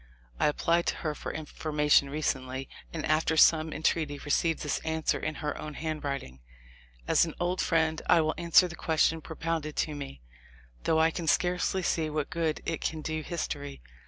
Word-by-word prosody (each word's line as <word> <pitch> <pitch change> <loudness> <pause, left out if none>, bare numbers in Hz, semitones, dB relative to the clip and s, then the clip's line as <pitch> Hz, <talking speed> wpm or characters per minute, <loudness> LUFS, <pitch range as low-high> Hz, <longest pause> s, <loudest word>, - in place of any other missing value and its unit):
I - - +4
applied 170 +3 +1
to - - +1
her 155 - 0
for - - -6
information 150 -2 +1
recently, 135 -3 -2 0.2
and 160 - -4
after 155 +1 +1
some 160 0 +5
entreaty 155 -2 0
re 145 - -6
ceived 165 +2 +1
this 150 - -1
answer 160 0 -1
in 155 - -3
her 150 - -1
own 150 -1 -6
handwriting: 140 - -4 0.7
"As - - +5
an 165 -2 -3
old 180 +1 0
friend 160 -1 +1
I - - +7
will 155 0 0
answer 170 +2 +5
the 175 - -8
question 160 0 +1
propounded 160 -1 -3
to 155 - -1
me, 135 - -8 0.6
though 160 - +3
I 160 +1 +4
can 165 -1 -5
scarcely 180 +3 +1
see 160 -2 0
what 150 -1 -3
good 165 -2 -1
it 165 - -2
can 160 -1 -3
do 155 0 -2
history. 150 -3 -4
155 Hz, 180 wpm, -29 LUFS, 150-165 Hz, 0.7 s, I